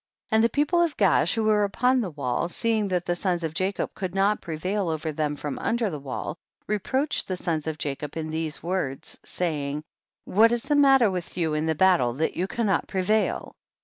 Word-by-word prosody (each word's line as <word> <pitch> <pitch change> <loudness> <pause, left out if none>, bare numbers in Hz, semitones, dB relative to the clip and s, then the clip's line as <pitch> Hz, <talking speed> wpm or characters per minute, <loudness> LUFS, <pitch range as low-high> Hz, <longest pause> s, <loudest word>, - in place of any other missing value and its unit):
24. 220 - +1
And 220 - +5
the 230 - +4
people 295 +7 +2
of 330 -4 0
Gaash 180 -4 +3
who 225 - 0
were 215 -1 +3
upon 250 +5 +2
the 200 - -3
wall, 145 0 -2
seeing 220 +1 +1
that 180 -2 -1
the 175 - 0
sons 175 -1 -1
of 160 -1 -2
Jacob 190 +3 -1
could 185 -1 -5
not 200 +2 +2
prevail 180 +4 -2
over 160 0 -2
them 150 -1 -1
from 145 0 -5
under 230 -3 0
the 150 - -5
wall, 140 +4 -5 0.3
reproach 260 +8 0
ed - - -18
the 185 - -2
sons 160 -3 -2
of 160 -1 -2
Jacob 145 +1 -4
in 155 -1 -3
these 160 -2 -4
words; 165 -5 -3
saying, 150 -4 -3 0.4
25. - - -10
What 230 +1 +7
is 240 - 0
the 295 +2 +1
matter 270 -6 +5
with 180 -1 -5
you 160 -3 0
in 155 +1 0
the 160 - +1
battle 150 -9 +3
that 155 +6 -1
you 185 - -1
cannot 205 -4 0
prevail 210 +3 0
180 Hz, 215 wpm, -25 LUFS, 155-215 Hz, 0.4 s, What